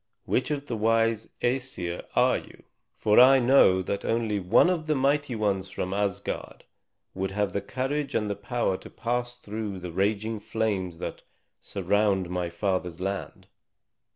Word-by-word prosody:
"Which 130 Hz, -, 0 dB
of 145 Hz, -1 st, -2 dB
the 120 Hz, -, -3 dB
wise 115 Hz, 0 st, +1 dB
Æsir 120 Hz, -9 st, -1 dB
are -, -, +4 dB
you? -, -, -16 dB, 0.3 s
For 105 Hz, +2 st, +4 dB
I 130 Hz, +2 st, +8 dB
know 120 Hz, -8 st, +5 dB
that 100 Hz, +2 st, -3 dB
only 115 Hz, -3 st, 0 dB
one 95 Hz, -, +4 dB
of 170 Hz, -4 st, -1 dB
the 155 Hz, -, +2 dB
mighty 140 Hz, -1 st, +1 dB
ones 100 Hz, -3 st, 0 dB
from 95 Hz, -1 st, -3 dB
Asgard 100 Hz, -1 st, -3 dB, 0.5 s
would 95 Hz, 0 st, -2 dB
have 100 Hz, 0 st, -1 dB
the 100 Hz, -, -2 dB
courage 135 Hz, +7 st, -2 dB
and 105 Hz, -, +1 dB
the 100 Hz, -, -2 dB
power 120 Hz, -6 st, -1 dB
to -, -, -12 dB
pass 120 Hz, 0 st, -2 dB
through 105 Hz, -3 st, -5 dB
the 90 Hz, -1 st, -6 dB
raging 105 Hz, +4 st, 0 dB
flames 100 Hz, -6 st, -2 dB
that -, -, -6 dB, 0.4 s
surround 100 Hz, -3 st, 0 dB
my 90 Hz, -1 st, -1 dB
father's 90 Hz, -1 st, -2 dB
land." 95 Hz, +1 st, -4 dB
105 Hz, 155 wpm, -27 LUFS, 95-125 Hz, 0.5 s, I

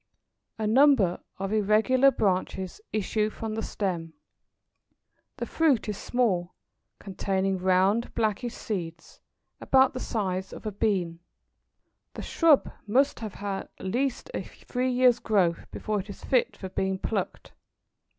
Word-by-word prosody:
A 220 Hz, -, -2 dB
number 225 Hz, -6 st, +4 dB, 0.2 s
of 195 Hz, +2 st, -3 dB
irregular 220 Hz, +6 st, +4 dB
branches 190 Hz, -, -1 dB
issue 215 Hz, +1 st, 0 dB
from 220 Hz, 0 st, -5 dB
the 220 Hz, -, -2 dB
stem. 175 Hz, -7 st, -3 dB, 1.2 s
The -, -, -3 dB
fruit 300 Hz, -10 st, +2 dB
is 210 Hz, -, -2 dB
small, 190 Hz, -7 st, 0 dB, 0.4 s
containing 195 Hz, -1 st, -1 dB
round 190 Hz, +5 st, +2 dB
blackish 225 Hz, +1 st, -1 dB
seeds, 170 Hz, -6 st, -6 dB, 0.4 s
about 265 Hz, -1 st, +4 dB
the -, -, -4 dB
size 190 Hz, -6 st, -2 dB
of -, -, -10 dB
a 215 Hz, -, -2 dB
bean. 185 Hz, -5 st, -1 dB, 1.0 s
The -, -, -6 dB
shrub 325 Hz, -4 st, +3 dB, 0.2 s
must 270 Hz, +7 st, +2 dB
have 215 Hz, -3 st, -7 dB
at 195 Hz, -1 st, -3 dB
least 255 Hz, -, -2 dB
a -, -, -2 dB
three 255 Hz, +1 st, -3 dB
years' 250 Hz, -1 st, +4 dB
growth 185 Hz, -8 st, +1 dB
before 215 Hz, -1 st, -2 dB
it 200 Hz, +2 st, -7 dB
is 200 Hz, -, -9 dB
fit 255 Hz, -2 st, +1 dB
for 190 Hz, -, -6 dB
being 190 Hz, +1 st, -1 dB
plucked. 195 Hz, -1 st, -4 dB
210 Hz, 130 wpm, -27 LUFS, 190-245 Hz, 1.2 s, number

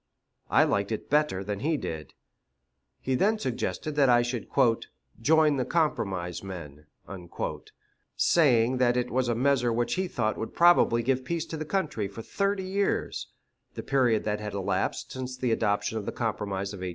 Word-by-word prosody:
I -, -, +5 dB
liked 100 Hz, +1 st, 0 dB
it 110 Hz, -, -5 dB
better 150 Hz, -11 st, +2 dB
than 100 Hz, 0 st, -4 dB
he 155 Hz, +6 st, 0 dB
did. 80 Hz, -, -6 dB, 0.9 s
He 130 Hz, -, -1 dB
then 205 Hz, +11 st, +2 dB
suggested 150 Hz, -, -3 dB
that 140 Hz, -3 st, +5 dB
I 120 Hz, -1 st, +5 dB
should 120 Hz, -1 st, -4 dB, 0.7 s
"join 155 Hz, +2 st, +4 dB
the 130 Hz, -, +1 dB
compromise 115 Hz, -, -1 dB
men," 75 Hz, -6 st, -9 dB, 1.3 s
saying 130 Hz, -6 st, +4 dB
that 125 Hz, -1 st, +3 dB
it 125 Hz, 0 st, -1 dB
was 130 Hz, 0 st, +1 dB
a 120 Hz, -, +1 dB
measure 125 Hz, -1 st, +2 dB
which 120 Hz, +1 st, 0 dB
he 185 Hz, 0 st, -1 dB
thought 110 Hz, -9 st, -1 dB
would 110 Hz, -, -5 dB
probably 170 Hz, -9 st, +5 dB
give 130 Hz, +1 st, 0 dB
peace 165 Hz, +4 st, -2 dB
to 165 Hz, -, -6 dB
the 155 Hz, -, -4 dB
country 155 Hz, -, -1 dB
for 100 Hz, +3 st, -9 dB
thirty 200 Hz, -, -1 dB
years 195 Hz, +1 st, -1 dB, 0.5 s
the -, -, -5 dB
period 125 Hz, -5 st, +2 dB
that 105 Hz, 0 st, -1 dB
had 105 Hz, -1 st, -5 dB
elapsed 95 Hz, -2 st, -2 dB
since 130 Hz, -1 st, -5 dB
the 125 Hz, -2 st, 0 dB
adoption 110 Hz, 0 st, 0 dB
of 100 Hz, -, -8 dB
the -, -, -1 dB
compromise 100 Hz, -4 st, -3 dB
of -, -, -7 dB
1820. 90 Hz, 0 st, -4 dB
120 Hz, 175 wpm, -27 LUFS, 105-150 Hz, 1.3 s, I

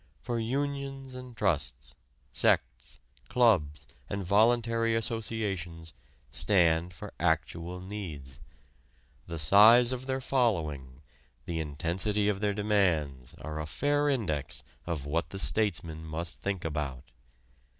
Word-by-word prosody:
For 120 Hz, -1 st, -2 dB
unions 135 Hz, +2 st, -3 dB
and 125 Hz, -2 st, -9 dB
trusts, 85 Hz, -9 st, -1 dB, 0.4 s
sects, -, -, 0 dB, 0.3 s
clubs 80 Hz, -12 st, +3 dB, 0.2 s
and 100 Hz, 0 st, -3 dB
voluntary 115 Hz, +3 st, +3 dB
associations 100 Hz, -8 st, -3 dB, 0.4 s
stand 85 Hz, -3 st, +3 dB
for 85 Hz, -, -10 dB
actual 85 Hz, +2 st, -1 dB
needs. 80 Hz, -9 st, -7 dB, 0.9 s
The 85 Hz, -, -5 dB
size 110 Hz, -, +7 dB
of 130 Hz, 0 st, -4 dB
their 130 Hz, 0 st, 0 dB
following, 80 Hz, -, -1 dB, 0.4 s
the 85 Hz, -1 st, -3 dB
intensity 85 Hz, +7 st, -1 dB
of 100 Hz, -2 st, -1 dB
their 105 Hz, -1 st, 0 dB
demands 85 Hz, -, 0 dB
are 75 Hz, 0 st, -6 dB
a 75 Hz, -, -5 dB
fair 145 Hz, -, +1 dB
index 80 Hz, -, -2 dB, 0.2 s
of 80 Hz, -5 st, -3 dB
what 80 Hz, +2 st, -1 dB
the 95 Hz, -, -7 dB
statesman 85 Hz, -6 st, 0 dB
must 80 Hz, +2 st, -5 dB
think 100 Hz, -4 st, -2 dB
about. 75 Hz, -3 st, -4 dB
95 Hz, 115 wpm, -30 LUFS, 80-115 Hz, 0.9 s, size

